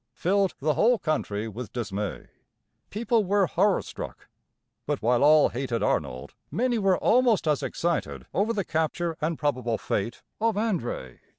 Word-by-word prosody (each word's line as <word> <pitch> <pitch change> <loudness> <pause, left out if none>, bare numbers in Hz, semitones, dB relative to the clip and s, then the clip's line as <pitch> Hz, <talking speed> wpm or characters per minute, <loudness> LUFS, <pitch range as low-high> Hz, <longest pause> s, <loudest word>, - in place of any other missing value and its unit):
filled 195 +1 +1
the 150 +2 +1
whole 240 +7 +4
country 115 - -2
with 110 0 -7
dismay. 105 -4 -4 0.6
People 230 +1 +1
were 200 +1 +3
horror 200 +2 +2
struck; - - -8 0.6
but - - 0
while 120 +2 +2
all 150 0 +6
hated 120 -2 -2
Arnold, 65 +1 -1 0.2
many 240 0 0
were 195 -2 +3
almost 235 -7 +3
as 150 -2 +2
excited 170 0 -2
over 210 +4 +1
the 205 -5 -1
capture 160 +1 -1
and 160 +1 -1
probable 125 -6 0
fate 105 +3 -3 0.2
of 225 -1 +1
André. 175 - -2
160 Hz, 150 wpm, -26 LUFS, -, 0.6 s, all